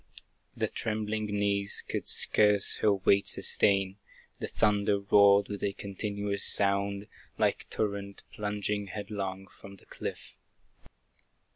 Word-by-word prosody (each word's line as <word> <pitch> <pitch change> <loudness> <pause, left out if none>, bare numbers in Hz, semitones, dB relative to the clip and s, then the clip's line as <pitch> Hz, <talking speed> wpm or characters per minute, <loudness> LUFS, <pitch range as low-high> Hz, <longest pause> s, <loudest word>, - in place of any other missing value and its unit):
Her - - +1
trembling 110 0 -4
knees 100 -1 +1
could - - -4
scarce 105 -2 +5
her 105 - +2
weight 100 0 +1
sustain; 100 -1 +2 0.4
The - - -4
thunder 105 -1 +1
roared 100 0 +4
with 100 -2 -7
a 100 - -2
continuous 100 0 -4
sound, 100 0 +1 0.3
Like - - -1
torrent, 100 -2 -4
plunging 105 -1 -4
headlong 100 -1 -6
from 100 0 -15
the 95 - -19
cliff. - - -8
100 Hz, 115 wpm, -28 LUFS, 100-105 Hz, 0.4 s, scarce